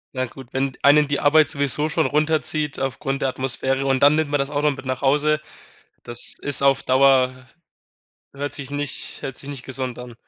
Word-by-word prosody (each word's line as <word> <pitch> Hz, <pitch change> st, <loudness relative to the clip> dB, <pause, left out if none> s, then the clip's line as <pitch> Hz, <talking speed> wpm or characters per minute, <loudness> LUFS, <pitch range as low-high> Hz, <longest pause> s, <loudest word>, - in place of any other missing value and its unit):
Na 130 Hz, -, -1 dB
gut, 130 Hz, +1 st, -12 dB
wenn 135 Hz, 0 st, -2 dB
einen 145 Hz, +1 st, +5 dB
die 145 Hz, -, -2 dB
Arbeit 155 Hz, +1 st, +5 dB
sowieso 145 Hz, +1 st, 0 dB
schon 160 Hz, 0 st, 0 dB
runterzieht 150 Hz, -1 st, 0 dB
aufgrund 135 Hz, +1 st, -3 dB
der 135 Hz, -, +1 dB
Atmosphäre 135 Hz, +1 st, -1 dB
und 135 Hz, 0 st, +1 dB
dann 145 Hz, +1 st, +6 dB
nimmt 155 Hz, -2 st, 0 dB
man 145 Hz, -1 st, 0 dB
das 140 Hz, +1 st, -1 dB
auch 145 Hz, 0 st, -2 dB
noch 150 Hz, 0 st, +2 dB
mit 135 Hz, -1 st, -9 dB
nach 130 Hz, 0 st, -3 dB
Hause, 150 Hz, +3 st, +2 dB, 0.7 s
das 120 Hz, 0 st, +1 dB
ist 145 Hz, -1 st, 0 dB
auf 135 Hz, 0 st, +3 dB
Dauer 130 Hz, -1 st, +3 dB, 0.9 s
hört 145 Hz, +1 st, -5 dB
sich 140 Hz, -1 st, -7 dB
nicht 145 Hz, -1 st, -4 dB
hört 135 Hz, -2 st, -6 dB
sich 140 Hz, -, -7 dB
nicht 135 Hz, -3 st, -9 dB
gesund 130 Hz, -2 st, -3 dB
an. 125 Hz, -1 st, -9 dB
140 Hz, 200 wpm, -22 LUFS, 130-145 Hz, 0.9 s, dann